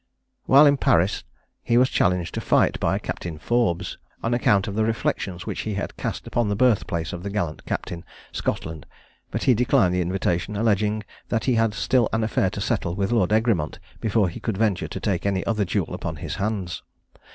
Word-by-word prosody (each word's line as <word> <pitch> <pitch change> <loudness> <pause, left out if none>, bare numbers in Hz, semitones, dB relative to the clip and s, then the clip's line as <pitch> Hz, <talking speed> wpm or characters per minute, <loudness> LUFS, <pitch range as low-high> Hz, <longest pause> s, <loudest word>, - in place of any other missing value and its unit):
While 140 +3 +8
in 145 -1 +5
Paris, 95 -5 +2 0.4
he 120 - +2
was 125 +1 +5
challenged 90 -7 +1
to - - -3
fight - - +2
by - - +1
a - - -1
Captain 85 -3 -5
Forbes, 105 -3 0 0.2
on 115 - 0
account 105 -4 +3
of 100 - -3
the 110 +2 +1
reflections 95 -5 -2
which - - -4
he 110 -2 -3
had 100 - -4
cast - - -4
upon 120 -3 0
the 100 - 0
birthplace 100 -8 +1
of 90 - -5
the 100 - -4
gallant 85 -7 -3
captain, 85 -1 -4 0.3
Scotland; 80 -3 -3 0.4
but - - -3
he 130 - +5
declined 110 -6 +3
the 90 - +1
invitation, 90 +2 -1
alleging 105 0 +1 0.3
that 115 -1 0
he 130 - +3
had 115 -2 +2
still 125 -1 +2
an 115 0 +1
affair 105 -3 +1
to 100 - -5
settle 100 -5 -1
with 100 +1 -1
Lord 105 -5 +2
Egremont 110 -8 +1 0.2
before 110 -2 +2
he 85 - -6
could 110 -4 -3
venture 105 -4 +1
to - - -6
take 95 -5 -1
any 95 -1 0
other 110 -3 +1
duel 90 - -1
upon - - -4
his - - -5
hands. 100 -3 -2
100 Hz, 200 wpm, -24 LUFS, 90-115 Hz, 0.4 s, While